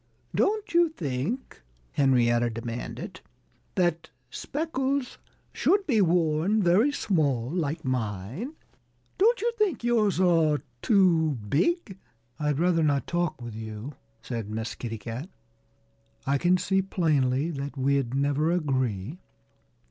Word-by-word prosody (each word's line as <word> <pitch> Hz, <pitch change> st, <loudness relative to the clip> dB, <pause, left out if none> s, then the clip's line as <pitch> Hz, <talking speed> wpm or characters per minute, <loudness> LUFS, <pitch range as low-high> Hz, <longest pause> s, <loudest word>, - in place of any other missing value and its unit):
"Don't 420 Hz, -1 st, 0 dB
you 345 Hz, -1 st, +5 dB
think," 160 Hz, -, -4 dB, 0.3 s
Henrietta 120 Hz, -3 st, +3 dB
demanded, 115 Hz, +1 st, -6 dB, 0.5 s
"that 175 Hz, -3 st, 0 dB, 0.2 s
speckles 275 Hz, -, -2 dB, 0.3 s
should 395 Hz, 0 st, +2 dB
be 230 Hz, -, +3 dB
worn 170 Hz, +3 st, +2 dB
very 195 Hz, +11 st, +4 dB
small, 145 Hz, -, 0 dB
like 160 Hz, -2 st, -2 dB
mine? 125 Hz, -, -3 dB, 0.7 s
Don't 470 Hz, +5 st, +4 dB
you 475 Hz, +2 st, +1 dB
think 400 Hz, -, +1 dB
yours 220 Hz, -6 st, +2 dB
are 165 Hz, -5 st, +3 dB, 0.2 s
too 170 Hz, -, +3 dB
big?" 195 Hz, -, 0 dB, 0.4 s
"I'd 150 Hz, -2 st, 0 dB
rather 170 Hz, 0 st, +2 dB
not 145 Hz, -3 st, +2 dB
talk 170 Hz, -7 st, -2 dB
with 120 Hz, -2 st, -6 dB
you," 110 Hz, +4 st, -7 dB, 0.3 s
said 115 Hz, -3 st, -4 dB
Miss 110 Hz, +1 st, -3 dB
Kitty 115 Hz, -2 st, -5 dB
Cat. 120 Hz, -, -6 dB, 1.0 s
"I 140 Hz, +1 st, +1 dB
can 180 Hz, +3 st, +4 dB
see 190 Hz, +1 st, +1 dB
plainly 155 Hz, -5 st, +1 dB
that 140 Hz, -1 st, -5 dB
we'd 135 Hz, -2 st, +1 dB
never 145 Hz, +3 st, +1 dB
agree." 130 Hz, -, -1 dB
155 Hz, 120 wpm, -27 LUFS, 130-195 Hz, 1.0 s, you